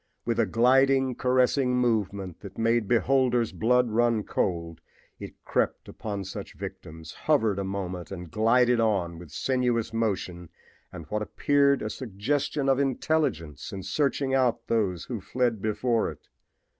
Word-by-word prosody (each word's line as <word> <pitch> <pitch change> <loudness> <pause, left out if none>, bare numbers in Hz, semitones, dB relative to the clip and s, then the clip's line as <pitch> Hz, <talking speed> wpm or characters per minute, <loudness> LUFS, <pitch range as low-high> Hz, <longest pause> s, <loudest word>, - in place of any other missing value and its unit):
With 115 0 0
a 115 - +3
gliding, 130 +4 +3
caressing 125 +1 +2
movement 100 -7 -1
that 100 -2 -11
made 115 -1 +1
beholders' 125 0 +2
blood 125 +1 +2
run 115 -1 +2
cold 85 -5 -2 0.4
it - - -8
crept - - -1
upon 100 -2 -5
such 95 - -8
victims, 80 0 -8 0.2
hovered 110 -10 +3
a - - -1
moment 95 -2 -4
and 90 -4 -8
glided 120 +3 +3
on 95 -7 0
with 85 -2 -11
sinuous 120 - 0
motion 95 -6 -2 0.4
and 80 - -9
what 105 0 -1
approached 140 +5 +2
a 105 - -2
suggestion 135 +6 -2
of 135 0 +3
intelligence 130 - -1
in 95 -1 -6
searching 140 +2 0
out 125 -3 +1
those 100 -7 0
who 115 -5 -5
fled 120 -1 -1
before 115 +2 0
it. - - -12
115 Hz, 145 wpm, -27 LUFS, 95-125 Hz, 0.4 s, a